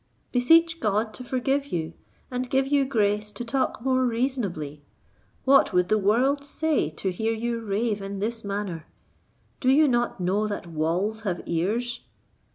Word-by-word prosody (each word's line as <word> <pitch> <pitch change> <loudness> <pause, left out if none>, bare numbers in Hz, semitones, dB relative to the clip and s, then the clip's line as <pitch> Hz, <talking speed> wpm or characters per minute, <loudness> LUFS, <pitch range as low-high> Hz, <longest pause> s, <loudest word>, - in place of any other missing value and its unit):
Beseech 325 +6 +4
God 215 +1 0
to 250 - -8
forgive 270 +3 0
you, 165 - -3 0.4
and 250 0 -3
give 265 0 +2
you 280 -1 +3
grace 210 -4 0
to 240 - -6
talk 240 -1 -1
more 260 -1 +2
reasonably. 225 - -2 0.6
What 270 -5 +5
would 180 0 +2
the 215 - +3
world 250 +8 +2
say 295 - 0
to 185 +4 -3
hear 220 +5 -1
you 235 +1 -2
rave 210 0 -1
in 195 0 -5
this 225 +3 -3
manner? 200 -5 -4 0.7
Do 255 - +1
you 295 +3 +6
not 240 -4 0
know 195 +4 +1
that 205 -4 -4
'walls 170 +7 -1
have 185 -5 -2
ears?'" 220 +9 -1
225 Hz, 160 wpm, -26 LUFS, 195-260 Hz, 0.7 s, you